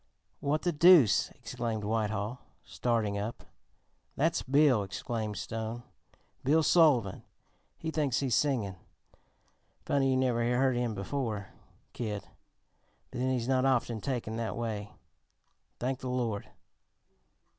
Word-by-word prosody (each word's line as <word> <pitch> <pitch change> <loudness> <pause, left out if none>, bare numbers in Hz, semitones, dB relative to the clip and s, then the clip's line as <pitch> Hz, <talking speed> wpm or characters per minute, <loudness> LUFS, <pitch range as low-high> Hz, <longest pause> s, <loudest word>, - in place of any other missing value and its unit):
"What 150 +2 0
the 175 - +2
deuce!" 150 - +6
exclaimed 120 -3 -4
Whitehall, 110 +2 -1 0.2
starting 110 -4 -1
up. 110 +3 -5 0.7
"That's 165 +4 +1
Bill," 140 -4 +4
explained 105 +1 -4
Stone. 110 +4 -4 0.6
"Bill 155 +4 +3
Sullivan. 145 - +4 0.6
He 160 - -4
thinks 145 -6 0
he's 135 -4 -1
singin'. 115 -11 +1 1.1
Funny 135 -1 +2
you 130 - +2
never 125 -2 +1 0.2
heard 130 -1 +3
him 120 -2 -1
before, 105 -1 -3 0.4
Kid, 105 -4 -4 0.9
but 125 - -6
then 130 +1 +1
he's 125 -2 -1
not 130 -1 +2
often 120 -4 +1
taken 115 -4 -3
that 115 -1 -3
way, 105 -3 -4 0.9
thank 130 +1 -2
the 130 - -5
Lord." 120 -5 -2
120 Hz, 120 wpm, -30 LUFS, 110-135 Hz, 1.1 s, deuce